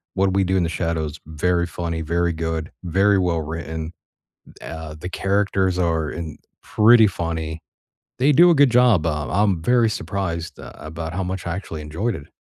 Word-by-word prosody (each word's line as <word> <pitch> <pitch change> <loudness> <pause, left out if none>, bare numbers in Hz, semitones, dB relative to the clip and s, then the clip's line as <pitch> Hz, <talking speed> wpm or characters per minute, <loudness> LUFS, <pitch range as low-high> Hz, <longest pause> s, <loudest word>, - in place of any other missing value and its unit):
What 95 0 +2
We 95 0 +3
Do 95 +1 +1
in 90 - +2
the 85 - -1
Shadows, 80 -3 -2
very 85 +2 0
funny, 85 -1 -4
very 85 +2 0
good, 80 0 -3
very 95 +3 +3
well-written. 80 -2 -3 0.7
Uh, 80 0 -7
the 90 - -5
characters 95 -1 0
are 80 -3 0
in 80 -3 -6 0.2
pretty 110 +1 +5
funny. 80 -3 -4 0.6
They 140 +3 +4
do 175 +4 +7
a - - +4
good 140 -2 +5
job, 120 -9 +4
um, 75 -3 -2
I'm 100 -3 +2
very 120 +2 +3
surprised 85 -3 -4
a - - -11
about 80 +1 -6
how 95 +1 -2
much 95 -1 -4
I 85 - -2
actually 80 -5 -6
enjoyed 85 +11 -2
it. 70 - -10
85 Hz, 175 wpm, -22 LUFS, 80-95 Hz, 0.7 s, do